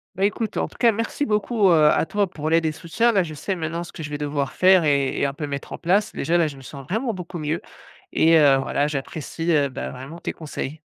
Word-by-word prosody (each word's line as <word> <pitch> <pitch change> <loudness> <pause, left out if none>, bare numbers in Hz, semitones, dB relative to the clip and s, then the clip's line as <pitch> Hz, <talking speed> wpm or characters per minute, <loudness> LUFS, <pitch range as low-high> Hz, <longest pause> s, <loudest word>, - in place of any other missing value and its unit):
Bah 195 +1 +1
écoute, 215 +2 -2
en - - 0
tout - - -17
cas, 235 -1 +5
merci 230 +6 -2
beaucoup, 210 -2 +2
heu, - - +6 0.2
à - - +2
toi 205 +3 0
pour 155 -3 -4
l'aide 165 0 +3
et 155 - 0
soutien. 180 +10 0
Là, 195 -4 +3
je 155 - -7
sais 190 +6 -3
maintenant 165 0 -3
ce - - -11
que 160 - -8
je 150 - -6
vais 145 - -4
devoir 145 -2 -2
faire 185 -1 +5
et 140 -3 +1
et - - +2
un 140 - -1
peu 150 0 -5
mettre 140 -1 -6
en - - -6
place. 195 +5 +1
Déjà 175 +1 0
là, 170 - +3
je 145 - -7
me 135 - -13
sens 135 +1 -10
vraiment 225 +3 -1
beaucoup 180 -1 -7
mieux 155 +2 -2 0.5
et 165 0 +5
heu, 140 -3 +6
voilà 140 +1 0
j'apprécie, 155 +3 -4
heu, 145 -3 +3
bah, 130 - -5
vraiment 135 +7 -9
tes - - -3
conseils. 155 -1 -6
165 Hz, 265 wpm, -23 LUFS, 145-190 Hz, 0.5 s, heu